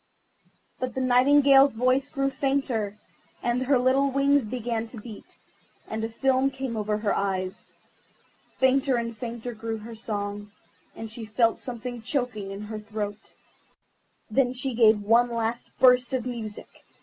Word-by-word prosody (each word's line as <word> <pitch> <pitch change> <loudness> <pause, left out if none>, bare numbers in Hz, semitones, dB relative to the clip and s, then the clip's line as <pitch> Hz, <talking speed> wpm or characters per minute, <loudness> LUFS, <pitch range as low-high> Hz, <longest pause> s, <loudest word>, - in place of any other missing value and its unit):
But 255 -2 -3
the - - -1
Nightingale's 270 +1 +5
voice 255 +4 +2
grew 275 -1 -1
fainter, 260 -8 -1 0.5
and 240 +1 0
her 265 +1 +3
little 260 +3 +3
wings 275 -1 +2
began 230 0 -3
to 230 - -9
beat, 215 -1 -11 0.5
and 220 0 -4
a 225 - -2
film 265 +3 +2
came 265 -3 -5
over 210 -1 -1
her 210 -1 0
eyes. 185 -1 -2 0.9
Fainter 265 0 +3
and 235 -1 -2
fainter 235 +1 -6
grew 225 0 -4
her 225 +2 -9
song, 205 -2 -4 0.5
and 225 - -6
she 225 +1 -6
felt 225 +1 +1
something 245 -1 -6
choking 245 -5 -2
her 195 - -6
in 200 - -7
her 215 0 -6
throat. 210 0 -6 1.0
Then 250 +1 +2
she 260 +1 -2
gave 220 -3 +4
one 235 +3 +4
last 230 0 -2
burst 250 0 +5
of 250 -2 -2
music. 230 -4 -7
235 Hz, 150 wpm, -26 LUFS, 220-260 Hz, 1.0 s, Nightingale's